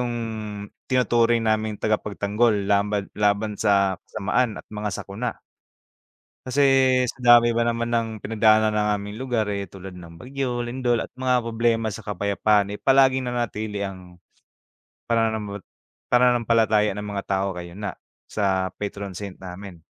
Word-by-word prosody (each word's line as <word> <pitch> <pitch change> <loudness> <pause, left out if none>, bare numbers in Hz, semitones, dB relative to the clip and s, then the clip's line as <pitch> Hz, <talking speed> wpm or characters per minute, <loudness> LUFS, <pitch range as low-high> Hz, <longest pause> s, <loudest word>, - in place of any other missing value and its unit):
yung 120 -1 -1 0.8
tinuturing 120 -2 +2
naming 110 -1 0
tagapagtanggol 105 0 0
laban 100 0 +1
laban 105 +1 +1
sa 100 -3 +2
kasamaan 110 +3 -1
at - - -9
mga 105 0 -3
sakuna. 105 +4 -5 1.1
Kasi 140 +3 +1 0.5
sa - - -19 0.2
dami 120 0 +3
ba 115 0 +1
naman 115 0 -1
ng 115 -1 +1
pinagdaanan 110 0 +3
ng 105 0 0
aming 105 +1 -6
lugar, 120 -4 -1
eh, 100 -1 -3
tulad 95 +1 -10
ng 85 -1 -12
bagyo, 125 -2 -3
lindol 120 -1 0
at - - -9
mga 125 -1 +2
problema 115 -1 0
sa 110 +1 -8
kapayapaan, 100 0 +1
eh, - - -7
palaging 130 -1 +4
nanatili 110 -4 -3
ang 95 -2 -8 0.9
pananam 110 -3 -1 0.5
pananampalataya 115 -3 +3
ng 105 - -5
mga 100 -1 -4
tao 95 0 0
ngayon 90 +3 -7
nga - - -3 0.3
sa 95 -3 -1
patron 100 -1 -5
saint 100 0 -7
namin. 95 0 -9
105 Hz, 140 wpm, -24 LUFS, 100-120 Hz, 1.1 s, palaging